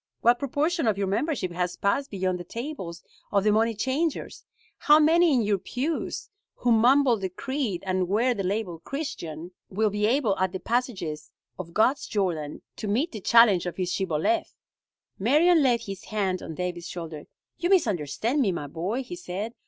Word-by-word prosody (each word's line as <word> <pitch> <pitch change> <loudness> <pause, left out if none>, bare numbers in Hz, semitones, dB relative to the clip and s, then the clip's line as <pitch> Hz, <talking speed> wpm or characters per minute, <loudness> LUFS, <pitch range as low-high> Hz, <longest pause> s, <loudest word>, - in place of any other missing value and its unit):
What 240 +1 +4
proportion 295 +3 0
of 210 -3 +2
your 200 - 0
membership 200 - -1
has 180 0 -2
passed 270 +8 0
beyond 185 -2 -1
the - - -6
tables 190 - -6 0.3
of 200 -2 +2
the 210 - +4
money 225 +2 +2
changers? 270 +8 -2 0.4
How 300 0 +6
many 325 +2 +5
in 250 -5 +3
your 205 -2 +1
pews, 285 - -3 0.2
who 245 - 0
mumble 245 +2 +5
the 190 -2 -3
creed 235 -2 -3
and 185 -1 0
wear 230 +7 +2
the 205 - -3
label 190 -3 -2
'Christian,' 175 - -6 0.2
will 210 +2 +1
be 210 +1 +1
able 235 -4 +2
at 185 0 0
the 190 - -3
passages 190 -11 -2 0.3
of 170 -2 -8
God's 255 +6 +2
Jordan 165 -8 -2
to 215 - -4
meet 255 +12 0
the 215 - -7
challenge 210 -6 +5
of 175 - -5
his 180 -1 -1
Shibboleth?" 190 - 0 0.6
Marion 310 - +4
laid 245 -4 +3
his 195 -2 -7
hand 195 -4 -1
on 160 - -7
David's 180 0 -4
shoulder. 165 -4 -7 0.3
"You 345 +1 0
misunderstand 230 - +1
me, 205 -7 +2
my 170 -4 -4
boy," 180 - -3
he 260 - -7
said. 220 - -5
210 Hz, 175 wpm, -26 LUFS, 180-265 Hz, 0.6 s, How